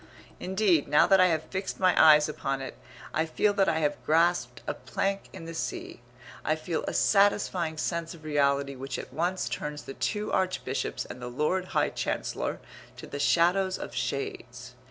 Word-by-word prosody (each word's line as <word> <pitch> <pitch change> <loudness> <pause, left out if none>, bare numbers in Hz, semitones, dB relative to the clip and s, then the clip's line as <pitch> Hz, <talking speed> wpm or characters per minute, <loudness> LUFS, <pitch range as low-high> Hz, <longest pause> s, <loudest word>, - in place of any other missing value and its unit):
Indeed, 185 -4 +2
now 150 - +5
that 195 -1 +5
I 185 - +6
have 160 -3 0
fixed 190 0 -5
my 185 -1 +4
eyes 150 -1 +7
upon 135 -3 -3
it, 135 -3 -6 0.4
I 160 +1 +1
feel 205 +6 +1
that 195 -2 +3
I 160 - +1
have 150 -1 -1
grasped 170 +3 +1
a - - -2
plank 195 0 -3
in 165 - -9
the 165 - -7
sea; 125 -5 -5 0.4
I 155 - +1
feel 160 +1 -3
a - - -1
satisfying 195 -5 +2
sense 170 +1 -2
of 160 - -16
reality 140 -2 +1
which 135 +1 -5
at - - -8
once 175 +5 -1
turns 150 0 -4
the 135 - -8
two 210 +6 -2
Archbishops 185 -8 -1
and 125 - -9
the 125 - -5
Lord 150 +9 0
High - - +3
Chancellor - - -3 0.4
to - - -8
the 145 - -6
shadows 180 +5 +3
of - - -7
shades. 125 -1 -4
160 Hz, 180 wpm, -28 LUFS, 140-185 Hz, 0.4 s, eyes